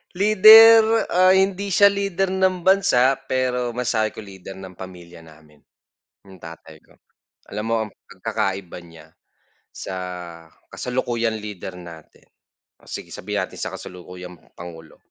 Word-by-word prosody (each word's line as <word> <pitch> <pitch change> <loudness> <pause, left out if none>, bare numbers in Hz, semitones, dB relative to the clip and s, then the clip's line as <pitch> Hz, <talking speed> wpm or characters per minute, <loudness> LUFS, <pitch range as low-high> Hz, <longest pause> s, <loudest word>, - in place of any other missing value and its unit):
Leader, 220 +3 +7
ah, 185 +1 +4
hindi 195 +1 0
siya 200 +1 +4
leader 195 -1 -2
ng 185 -1 0
bansa, 165 -10 +3
pero 125 -2 -2
masabi 115 -3 -1
ko - - -9
leader 95 -1 -11
ng 95 -1 -11
pamilya 90 -2 -12
namin, 75 -2 -19 0.7
yung 95 - -14
tatay 80 -2 -13
ko. - - -24 0.6
Alam 105 - -4
mo 115 - 0
ang 105 - -11
pagkakaiba 95 -2 -5
niya 85 -2 -16 0.7
sa 95 - -7 0.7
kasalukuyang 120 -2 -3
leader 105 -3 -8
natin, 85 -3 -14 0.5
o - - -21
sige, - - -8
sabihin - - -4
natin - - -12
sa - - -3
kasalukuyang 90 0 -11 0.2
Pangulo. 80 -2 -12
115 Hz, 130 wpm, -21 LUFS, -, 0.7 s, Leader